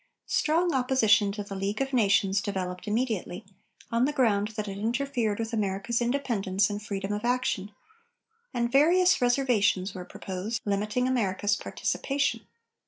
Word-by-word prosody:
Strong 335 +2 +1
opposition 250 -6 +3
to 205 +1 -5
the 200 - -8
League 195 +2 -2
of 270 0 -2
Nations 200 -3 +3
developed 185 -1 -4
immediately, 215 -5 -2 0.5
on 230 +2 +3
the 290 - 0
ground 220 -8 +2
that 215 -1 -3
it 195 0 -5
interfered 235 -1 -1
with 225 +1 -4
America's 210 +2 -1
independence 220 -7 0
and 205 0 -4
freedom 200 -1 -4
of 210 +1 -3
action, 245 -5 0 0.8
and 235 0 -1
various 350 +6 +4
"reservations" 240 -7 +2
were 185 - -6
proposed, 190 +5 -5
limiting 210 +5 0
America's 205 -4 +1
participation. 280 +4 -2
215 Hz, 140 wpm, -27 LUFS, 200-250 Hz, 0.8 s, various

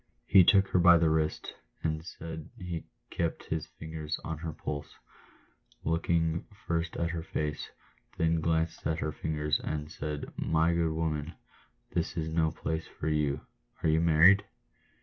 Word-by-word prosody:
He 95 0 +7
took 100 +2 +5
her 90 - +3
by 85 0 +8
the 80 -1 +3
wrist, 80 -1 0 0.3
and 80 -1 0
as 80 - -10 0.4
he 90 -5 -5 0.3
kept 85 -1 -2
his 80 -1 -1
fingers 80 -1 -5
on 80 -1 -4
her 80 0 -4
pulse, 75 -1 -5 0.9
looked 80 +1 -1 0.6
first 85 0 -1
at 85 0 0
her 85 -1 -3
face, 75 -2 -3 0.5
then 80 0 +2
glanced 80 0 0
at 80 0 0
her 75 -1 -2
figure, 75 0 -3
and 75 0 -3
said, 75 -1 -5
" - - -31 0.2
My 80 +2 +4
good 85 -1 +1
woman, 80 -1 -2 0.6
this 85 +1 -1
is 80 -1 -1
no 80 0 +2
place 80 0 -3
for 80 - -4
you 75 -2 +1 0.2
— - - -39
are - - +3
you 80 +1 +3
married?" 85 +5 +6
80 Hz, 165 wpm, -30 LUFS, 75-85 Hz, 0.9 s, by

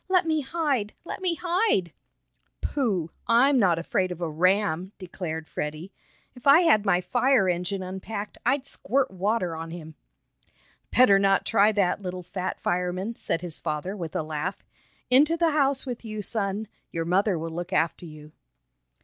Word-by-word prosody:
"Let 365 -1 +3
me 315 -1 +1
hide! 275 -8 -1
Let - - -6
me 360 -3 0
hide!" 350 - +1 0.7
"Pooh! 195 - -1 0.2
I'm 255 +4 +5
not 180 -6 +3
afraid 185 +2 -1
of 175 - -6
a 170 - -2
ram!" 185 +3 +1
declared 165 -4 -6
Freddie. 155 +5 -5 0.4
"If 245 +1 -8
I 285 +5 +8
had 215 - +4
my 180 -2 +3
fire 245 +2 +2
engine 180 +2 -1
unpacked, 200 +3 -6
I'd 275 -1 +1
squirt 275 -2 -1
water 190 -2 -1
on 165 +1 -6
him!" 160 -2 -8 1.0
"Better 200 -6 +6
not 195 0 +3
try 205 +2 +4
that, 195 -1 +1
little 180 -1 -5
fat 185 +1 -4
fireman," 180 +5 -2
said 165 - -2
his 175 -3 -3
father 155 +6 -3
with 170 -5 -6
a - - 0
laugh. 155 +5 -4 0.5
"Into 295 +6 +5
the 335 -1 +2
house 280 -3 +2
with 245 -3 -5
you, 215 -2 -5
son. 205 0 -2 0.2
Your 165 0 -3
mother 190 +2 +2
will 165 +1 -4
look 175 +2 -5
after 170 -1 0
you." 155 -1 -12
195 Hz, 165 wpm, -26 LUFS, 175-245 Hz, 1.0 s, I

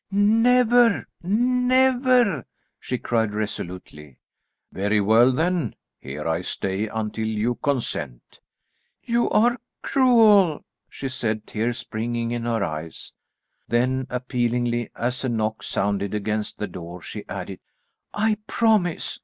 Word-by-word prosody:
"Never, 230 +3 +4 0.2
never," 250 - +2 0.3
she 125 - -3
cried 110 -3 -1
resolutely. 90 - -6 0.5
"Very 100 +2 +1
well 110 +5 +5
then; 160 - 0 0.2
here 75 +4 -6
I 80 +1 0
stay 95 +3 -2
until 110 0 -3
you 110 +2 0
consent." 115 - -3 0.6
"You 235 0 +1
are 240 +3 +3 0.2
cruel," 220 - +4 0.2
she 135 - -5
said, 110 -5 -3
tears 115 +2 -2
springing 115 +1 -3
in 120 -1 -3
her 115 -3 0
eyes. 80 -1 -6 0.5
Then 130 +2 0
appealingly, 120 -1 -1
as 125 +3 -2
a 130 - 0
knock 110 -1 -1
sounded 100 0 -1
against 105 0 -2
the 105 - -2
door, 90 -2 -9
she - - -7
added, - - -6 0.5
"I 215 0 +1
promise. 215 -7 +1
120 Hz, 115 wpm, -23 LUFS, -, 0.6 s, well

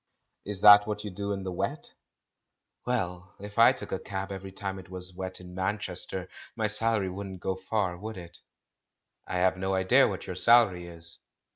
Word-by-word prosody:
"Is 100 -2 -3
that 105 0 +9
what 105 -1 -3
you 105 - -5
do 100 +2 -4
in 100 -1 -3
the 95 - -4
wet?" 90 - -4 0.9
"Well, 95 -5 -3
if 105 +2 -7
I 115 - +8
took - - -7
a - - -2
cab 95 0 -5
every 95 0 -7
time 95 0 -5
it 90 - -13
was 90 0 -7
wet 95 0 -5
in 90 0 -11
Manchester, 95 -1 0 0.3
my 110 -2 -1
salary 105 -2 0
wouldn't 95 0 -7
go 95 +1 -2
far, 95 -2 -2
would 110 +4 -7
it?" 85 -2 -11 0.9
"I - - -4
have 95 +1 +2
no 95 +1 -1
idea 95 0 +4
what - - -5
your - - -5
salary 110 -7 +4
is." 85 -1 -10
95 Hz, 185 wpm, -28 LUFS, 90-105 Hz, 0.9 s, that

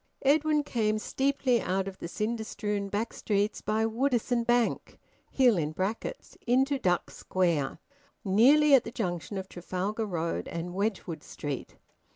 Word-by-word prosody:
Edwin 300 +2 +3
came 215 -6 0
steeply 265 0 +1
out 190 +1 -1
of 190 -1 -7
the - - -5
cinder 220 +5 -2
strewn 205 -2 -3
back 210 +3 -2
streets 205 0 -1
by 215 +1 0
Woodisun 240 0 +1
Bank 240 -1 +1 0.3
[hill] 245 -8 +4
into 235 - -1
Duck 180 -6 0
Square, 170 -7 0 0.5
nearly 275 +10 +5
at 265 - +7
the - - -6
junction 195 -4 -3
of 190 0 -5
Trafalgar 190 +5 -3
Road 170 -3 -2
and 170 +1 -5
Wedgwood 190 -5 -2
Street. 145 -3 -6
215 Hz, 135 wpm, -29 LUFS, 185-245 Hz, 0.5 s, at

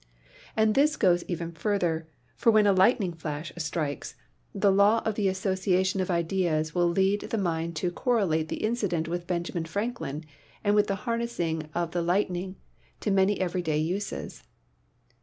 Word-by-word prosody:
And 220 0 +4
this 300 +4 +3
goes 175 -4 +3
even 170 -1 -3
farther, 170 -2 -1 0.3
for 230 - +4
when 215 -1 +5
a 200 - +5
lightning 190 -1 +3
flash 155 -1 -5
strikes, 150 -3 -3 0.4
the 200 - +2
law 205 +3 +4
of 220 - +1
the 205 -1 0
association 190 0 +1
of 185 - -2
ideas 170 -3 0
will 175 -1 +3
lead 190 +4 +2
the 225 - -1
mind 170 -3 -1
to 175 +3 -1
correlate 175 -8 +1
the - - -4
incident 200 -8 0
with 175 +1 -4
Benjamin 175 -1 -2
Franklin 165 - -3 0.4
and 205 -1 +3
with 210 0 +4
the 195 - 0
harnessing 175 -10 -2
of 170 -1 -1
the 175 - -1
lightning 180 +1 0 0.5
to 210 - 0
many 195 +1 +3
2 - - -5
PHYSICS - - +3
everyday 175 -4 -1
uses. 180 +7 -3
185 Hz, 165 wpm, -27 LUFS, 165-205 Hz, 0.5 s, when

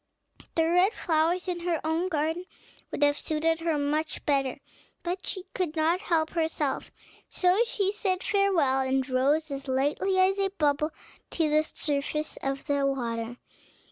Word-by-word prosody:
The 325 -1 +3
red 360 +5 +4
flowers 340 +2 +1
in 355 -1 -2
her 340 -2 -1
own 320 +3 0
garden 320 +1 -1 0.4
would - - -1
have 290 0 +3
suited 320 +1 0
her 330 -2 0
much 300 +2 -1
better, 275 -3 +1 0.5
but 360 +2 -3
she 375 - -3
could 350 -4 -2
not 330 +3 +2
help 320 -5 +1
herself: 320 -4 -1 0.4
so 365 +2 +2
she 395 -4 +1
said, 385 -3 0
"Farewell," 365 -10 +2
and 265 0 0
rose 285 +4 +1
as 275 0 -4
lightly 290 +9 +1
as 380 +1 +4
a 390 0 +2
bubble 300 -4 +1 0.4
to 320 -3 +1
the 305 +1 +5
surface 300 0 -2
of 270 0 -3
the 285 -1 +1
water. 240 -3 -2
315 Hz, 155 wpm, -27 LUFS, 285-360 Hz, 0.5 s, the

